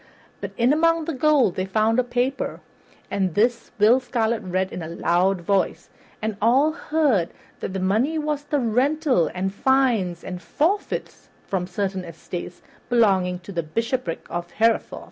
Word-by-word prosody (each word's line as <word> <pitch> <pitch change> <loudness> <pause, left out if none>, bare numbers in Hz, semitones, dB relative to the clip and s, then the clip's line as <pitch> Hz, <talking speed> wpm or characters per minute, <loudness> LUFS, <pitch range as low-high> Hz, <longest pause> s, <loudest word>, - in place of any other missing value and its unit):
But - - -4
in 245 +3 +4
among 330 +1 +2
the 330 - -3
gold 280 - +3
they 185 - -1
found 220 +4 +2
a - - +3
paper, 245 +2 -2 0.5
and 190 -4 0
this 235 +3 +1
Will 220 +5 +5
Scarlet 235 -3 -1
read 185 -1 -2
in - - -5
a 160 - -5
loud 175 +3 +1
voice, 195 +2 -1 0.3
and 215 -2 -2
all 260 +8 +4
heard 300 - +1 0.3
that - - -5
this 190 - -2
money 230 +12 +1
was 300 -1 -2
the 290 0 0
rental 255 - +2
and 190 +1 -2
fines 230 -8 +1
and 180 -1 -6
forfeits 360 - -2 0.2
from 180 -2 -2
certain 190 0 -2
estates 175 +1 -8 0.3
belonging 195 -7 +3
to 180 - -10
the 170 -3 -1
Bishopric 225 +3 -3
of 175 0 -5
Hereford. 225 +4 +1
220 Hz, 160 wpm, -23 LUFS, 185-265 Hz, 0.5 s, Will